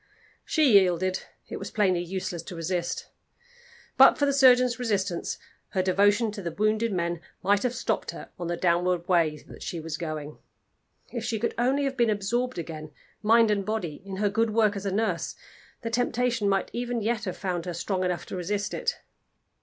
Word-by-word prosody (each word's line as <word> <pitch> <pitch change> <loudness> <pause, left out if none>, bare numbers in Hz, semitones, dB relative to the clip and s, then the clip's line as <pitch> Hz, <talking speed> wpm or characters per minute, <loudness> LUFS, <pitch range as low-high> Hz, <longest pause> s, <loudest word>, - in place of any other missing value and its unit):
She 275 -11 +5
yielded: 185 0 +1 0.3
it - - -5
was - - -6
plainly 185 -5 +2
useless 180 -1 -4
to 175 +2 -9
resist. 170 +1 -3 0.9
But - - +8
for 285 - +2
the 280 - +2
surgeon's 255 -2 +5
resistance, 200 -7 -1 0.4
her 185 -2 +1
devotion 205 +4 +3
to 205 -1 -7
the 175 - -3
wounded 215 +4 +1
men 170 -2 -1 0.2
might 200 +2 +3
have 250 -1 -1
stopped - - -1
her - - -8
on 175 - -3
the 175 0 -2
downward 175 0 +1
way 165 -4 +3
that - - -12
she 170 - -4
was 160 0 -5
going. 155 -3 -5 0.7
If 235 -3 -4
she 225 0 -1
could 230 +2 -1
only 260 +4 +1
have 270 -1 -2
been 235 -2 +3
absorbed 235 +5 -1
again, 155 -2 -6 0.3
mind 225 0 +5
and 200 -1 +1
body, 190 -7 -3
in 195 -1 -6
her 205 +1 +1
good 225 +3 +1
work 215 -2 +3
as 200 0 -4
a - - 0
nurse, 200 -4 -1 0.5
the 230 - -3
temptation 240 -2 +1
might 195 -1 0
even 240 -1 -2
yet 225 0 -1
have 185 - -4
found 180 -3 -3
her 175 - -2
strong 185 +2 -1
enough 180 -1 -1
to - - -6
resist 200 +3 -2
it. - - -2
200 Hz, 190 wpm, -27 LUFS, 175-230 Hz, 0.9 s, But